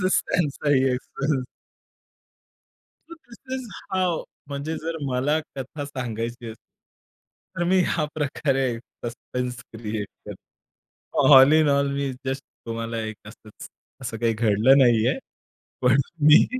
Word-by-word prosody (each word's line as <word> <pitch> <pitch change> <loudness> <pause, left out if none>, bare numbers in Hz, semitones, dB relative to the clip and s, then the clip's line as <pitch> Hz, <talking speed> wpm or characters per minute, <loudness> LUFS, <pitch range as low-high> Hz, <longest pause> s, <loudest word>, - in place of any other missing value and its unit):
तसंच 185 0 +3
त्यांचाही 145 -4 +2
एक्सप्रेशन. 135 +1 -2 1.7
तर 335 - -9 0.2
दिस - - -13 0.2
इज 255 -2 -6 0.3
हाऊ 185 -3 +1 0.2
म्हणजे 145 +3 -4
जर 165 +1 -4
मला 140 +5 +1 0.2
कथा 140 +2 -5
सांगायची 120 -4 -4 0.2
असेल, - - -11 1.0
तर 175 - +1
मी 190 0 +4
ह्या 155 -3 0
प्रकारे 135 -2 0 0.4
सस्पेन्स 125 +1 -4 0.2
क्रिएट 110 -2 -4 0.2
करतो. 150 - -2
All 135 +3 +8
in 155 -1 +5
all 140 0 +2
me 140 -1 -1
just 135 +1 -2 0.2
तुम्हाला 115 0 -3
एक 110 0 -5
असंच, 105 0 -12 0.3
असं 115 -3 -4
काही 115 0 +1
घडलं 110 +4 +4
नाहीये. 120 -4 +4 0.6
पण 125 +1 +4 0.3
मी 150 - +8
135 Hz, 125 wpm, -24 LUFS, 115-150 Hz, 1.7 s, All